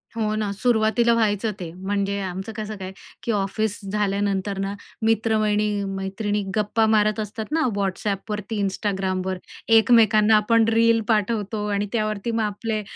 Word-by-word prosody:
हो 215 -2 0
ना 210 -2 -1
सुरवातीला 235 +1 +2
व्हायचं 220 -1 +1
ते. 170 -2 -6
म्हणजे 200 +2 -2
आमचं 190 +3 -5
कसं 215 0 -5
काय 190 -1 -6 0.3
की 235 - -1
ऑफिस 205 +1 -1
झाल्यानंतर 200 -1 -1
ना 195 +1 -2 0.3
मित्र, 225 0 +2
वहिनी, 210 -1 +1
मैत्रिणी 205 +2 -2
गप्पा 215 +1 +2
मारत 215 +1 +2
असतात 215 +4 -5
ना 320 - +1 0.2
WhatsAppवरती 205 +2 -2
Instagramवर. 190 -1 -1 0.4
एकमेकांना 220 -2 +5
आपण 225 +1 +3
रील 230 0 +4
पाठवतो 210 -1 0
आणि 205 +1 -1
त्यावरती 215 0 -1
मग 225 - 0
आपले 215 +1 -2
210 Hz, 140 wpm, -23 LUFS, 200-220 Hz, 0.4 s, एकमेकांना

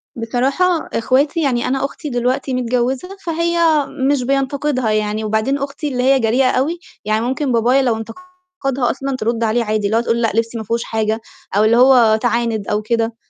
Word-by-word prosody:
بصراحة 270 +10 0
إخواتي 275 +7 +1
يعني 245 -4 0
أنا 270 +1 0
أختي 290 +1 -6
دلوقتي 250 +2 -1
متجوّزة 255 +9 -1
فهي 335 -3 +2 0.2
مش 280 -3 +1
بينتقِدها 275 -2 0
يعني 215 0 -1
وبعدين 220 +6 0
أختي 280 +2 -4
اللي 250 -2 -2
هي 270 0 +4
جريئة 250 +3 +2
أوي، 315 +7 0 0.3
يعني 215 +1 +1
ممكن 265 +2 -1
بابايا 245 +4 +3
لو 240 -4 +1
انتقدها 330 - -4
أصلًا 275 0 -4
ترُد 230 0 -1
عليه 230 +2 +1
عادي، 215 -1 -1
اللي 220 +3 +1
هو 230 - +2
تقول 235 0 0
لأ، 225 - +1
لِبسي 230 +1 -1
ما 220 - -4
فيهوش 230 +2 -2
حاجة 220 0 -1 0.4
أو 210 - +4
اللي 230 +2 +4
هو 245 -4 +6
تِعانِد 235 -4 -1
أو 210 +1 0
كده. 230 +1 -1
250 Hz, 180 wpm, -18 LUFS, 225-275 Hz, 0.4 s, هو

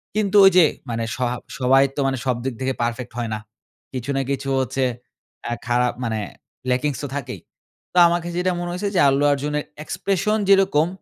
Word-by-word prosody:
কিন্তু 210 -2 0
ঐযে 185 -3 +7 0.2
মানে 115 -1 -2
সহা 125 -1 -1 0.2
সবাই 135 +2 +5
তো - - -4
মানে 135 -1 -1
সবদিক 125 0 -1
থেকে 130 0 0
পারফেক্ট 120 +1 -2
হয় 120 -2 -2
না। 110 - -3 0.5
কিছু 130 +1 -5
না 135 - +1
কিছু 135 0 -2
হচ্ছে 130 +1 -1 0.6
অ্যা 120 - -2
খারাপ 125 0 +2
মানে 110 -2 -1 0.5
ল্যাকিংস 130 +2 0
তো - - -2
থাকেই। 125 -8 -5 0.5
তো - - -3
আমার 170 +1 +1
কাছে 175 0 -5
যেটা 185 +1 +1
মনে 175 - -3
হইছে 200 +3 -2
যে - - +3
আল্লু 135 +1 +2
অর্জুনের 150 +1 -1 0.2
এক্সপ্রেশন 200 +6 0
যেরকম, 190 -5 +4
135 Hz, 180 wpm, -22 LUFS, 125-175 Hz, 0.6 s, ঐযে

